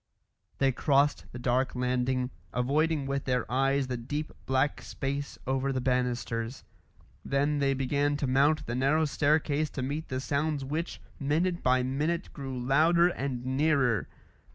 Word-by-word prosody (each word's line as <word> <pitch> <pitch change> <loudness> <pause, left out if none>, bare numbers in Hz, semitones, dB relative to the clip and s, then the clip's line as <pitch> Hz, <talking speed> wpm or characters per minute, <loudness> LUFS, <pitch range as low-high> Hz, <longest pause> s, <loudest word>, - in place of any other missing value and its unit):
They 135 -1 +3
crossed 140 +2 +2
the - - -7
dark 125 +1 0
landing, 125 0 0 0.2
avoiding 145 +4 +1
with 140 0 -2
their 125 -3 0
eyes 135 +1 +2
the 125 -1 -3
deep 145 +6 -4 0.2
black 130 +2 +1
space 140 +1 -4
over 135 +1 0
the 130 - -1
banisters. 125 -1 -1 0.6
Then 145 +2 +1
they 135 -1 +2
began 145 +2 +1
to 145 - -1
mount 140 +4 +3
the 120 - -3
narrow 140 +5 +2
staircase 150 +1 +1
to 130 - -4
meet 145 +4 -3
the 130 - -3
sounds 145 +1 -1
which, 155 +5 -3 0.2
minute 165 +5 0
by 130 0 +3
minute, 150 +7 -1
grew 135 -2 -5
louder 160 +7 +4
and 130 -7 -3
nearer. 130 - +2
135 Hz, 150 wpm, -29 LUFS, 130-145 Hz, 0.6 s, louder